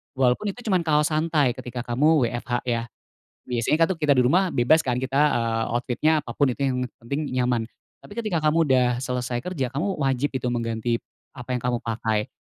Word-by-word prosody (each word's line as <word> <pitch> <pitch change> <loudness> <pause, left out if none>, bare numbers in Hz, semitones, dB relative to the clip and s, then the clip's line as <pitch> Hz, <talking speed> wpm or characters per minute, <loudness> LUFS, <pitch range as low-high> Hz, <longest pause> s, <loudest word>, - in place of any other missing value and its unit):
walaupun 130 +8 +2
itu 245 - -12
cuman 180 -3 +2
kaos 150 0 +3
santai 155 -4 +2
ketika 125 -1 -6
kamu 145 +4 +3
WFH 120 0 -3
ya. 120 -2 0 0.7
Biasanya 125 +7 +2
kan - - -7
kita 150 -3 +1
di 125 - +5
rumah 180 +7 +3
bebas 135 +6 +4
kan, 125 -1 0
kita, 130 +1 -2
eee, 115 -1 0
outfit-nya 125 +6 +1
apa 130 -5 -7
pun 140 -2 +3
itu 125 - -8
yang 125 -1 0 0.2
penting 140 +6 -3 0.2
nyaman. 125 -2 +1 0.4
Tapi 205 - -12
ketika 210 -7 -1
kamu 160 +2 +3
sudah 130 -2 +4 0.2
selesai 125 -1 -2
kerja, 155 -9 -2
kamu 185 +8 -1
wajib 135 +1 0
itu 125 -1 -2
mengganti 115 0 -1 0.4
apa 125 0 -4
yang 125 - -3
kamu 125 -1 +1
pakai. 110 0 -1
130 Hz, 190 wpm, -24 LUFS, 120-155 Hz, 0.7 s, di